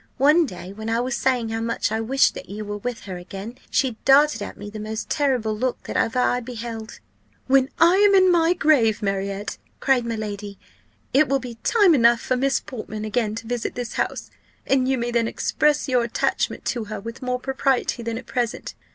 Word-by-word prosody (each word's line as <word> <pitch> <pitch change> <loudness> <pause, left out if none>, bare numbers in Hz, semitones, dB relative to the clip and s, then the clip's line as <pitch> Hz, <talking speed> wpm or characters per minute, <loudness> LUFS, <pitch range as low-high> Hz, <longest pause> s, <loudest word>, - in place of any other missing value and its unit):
One 300 +4 +5
day, 180 -2 -8
when 220 +2 -6
I 230 +1 +1
was 250 0 -1
saying 245 -3 0
how 225 0 -2
much 230 -2 -1
I 220 0 -1
wished 265 +5 +3
that - - -9
you 210 +2 -6
were 205 0 -5
with 245 +1 -4
her 190 -3 -7
again, 195 +6 -8
she 255 -5 0
darted 290 +2 +5
at - - -6
me 205 - -8
the 215 - -7
most 215 +1 -5
terrible 255 -8 +1
look 250 +3 -2
that - - -7
ever 225 - +1
I 250 0 +2
beheld. 230 -2 -7 0.5
"'When 265 0 +3
I 340 +3 +5
am 405 0 +5
in 375 -1 +6
my 340 0 +4
grave, 240 -11 +3
Marriott,' 195 +1 -3 0.2
cried 265 -3 +2
my 230 -1 -3
lady, 205 -2 -6 0.6
'it 285 +3 +5
will 275 - +3
be 240 -3 -8
time 410 -7 +5
enough 235 -4 +5
for 255 - -1
Miss 270 +2 +1
Portman 215 -3 -7
again 215 -1 -1
to 225 0 -7
visit 240 0 -3
this 245 -1 -4
house, - - -3 0.3
and 265 -1 +2
you 265 0 +1
may 240 0 -2
then 235 -1 +1
express 300 +5 +1
your 250 -2 +2
attachment 235 -1 -1
to 235 -3 -2
her 210 0 -6
with 230 +3 -8
more 250 -1 -2
propriety 265 -2 0
than 230 -1 -3
at - - -8
present. 240 -3 -3
240 Hz, 210 wpm, -23 LUFS, 220-270 Hz, 0.6 s, in